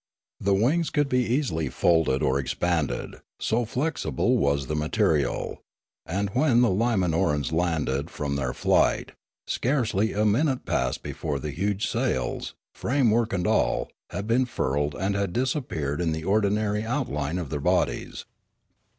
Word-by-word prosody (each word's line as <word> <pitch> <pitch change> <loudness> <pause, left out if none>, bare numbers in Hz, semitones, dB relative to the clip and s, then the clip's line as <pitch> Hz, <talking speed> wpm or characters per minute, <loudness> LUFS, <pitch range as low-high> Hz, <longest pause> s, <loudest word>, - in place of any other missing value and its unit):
The 100 0 +2
wings 150 - +2
could 145 -1 +1
be 125 -1 +2
easily 115 - 0
folded 80 -1 +2
or 65 +1 +2
expanded, 80 +3 -2 0.2
so 115 +2 0
flexible 120 - 0
was 70 -1 +1
the 75 - -3
material; 75 -2 0 0.5
and, 100 +3 -1
when 125 0 +3
the 120 - +4
Limanorans 90 - +1
landed 80 -4 0
from 70 -1 -3
their 65 -3 -1
flight, - - +2 0.3
scarcely 115 -6 0
a 105 +1 +1
minute 130 +5 +2
elapsed 65 0 -1
before 75 -3 -3
the 75 +2 -4
huge 100 +7 -1
sails, 115 - -2 0.2
framework 120 -4 +1
and 90 -2 -1
all, - - +1 0.2
had 100 - -4
been 120 +4 +2
furled 70 - -1
and 95 +2 -1
had 100 -3 -1
disappeared 120 - -1
in 80 -2 0
the 80 0 -4
ordinary 105 +2 +1
outline 90 - -2
of 85 -6 -5
their 75 - -2
bodies. - - 0
95 Hz, 140 wpm, -26 LUFS, 75-115 Hz, 0.5 s, the